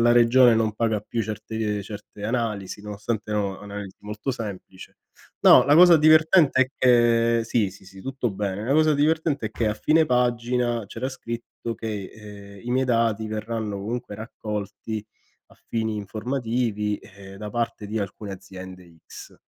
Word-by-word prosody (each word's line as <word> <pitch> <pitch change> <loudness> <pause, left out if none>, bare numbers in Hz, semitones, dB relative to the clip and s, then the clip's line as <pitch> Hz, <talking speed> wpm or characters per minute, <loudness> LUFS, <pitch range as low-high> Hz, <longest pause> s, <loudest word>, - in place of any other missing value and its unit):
la 120 0 +5
regione 120 0 +6
non 110 -1 +1
paga 110 -2 0
più 115 +2 -3
certe 105 -1 -3
certe 105 0 -10
analisi, 105 -4 -2
nonostante 105 +1 -4
erano 100 -2 -1
analisi 100 -1 -8
molto 105 +5 -5
semplice. 100 -6 -8 0.4
No, - - +8
la 145 - +4
cosa 175 +1 +8
divertente 155 -1 +5
è 130 - -3
che 115 -2 +4
sì, 110 -3 +1
sì, 95 - -16
sì 95 0 -13
tutto 130 0 -3
bene, 100 +1 -3
la 130 - +1
cosa 155 0 +4
divertente 150 -3 +1
è - - -6
che 110 +1 -2
a 105 - -1
fine 155 +7 +3
pagina, 120 -2 +1
c'era 115 +6 -4
scritto 115 -2 -6
che, 105 -4 -5
ehm, 100 -2 -12
i 120 - -4
miei 130 +1 +2
dati 115 -3 +1
verranno 110 -1 -3
comunque 110 +2 -5
raccolti 105 -1 -5 0.4
a - - -21
fini, 110 -1 -1
ehm, 105 - -3
informativi 110 0 -2 0.4
da 105 0 -6
parte 115 -1 -3
di 110 +2 -3
alcune 100 0 -5
aziende 95 -2 -11
X. - - -11
110 Hz, 160 wpm, -24 LUFS, 105-120 Hz, 0.4 s, No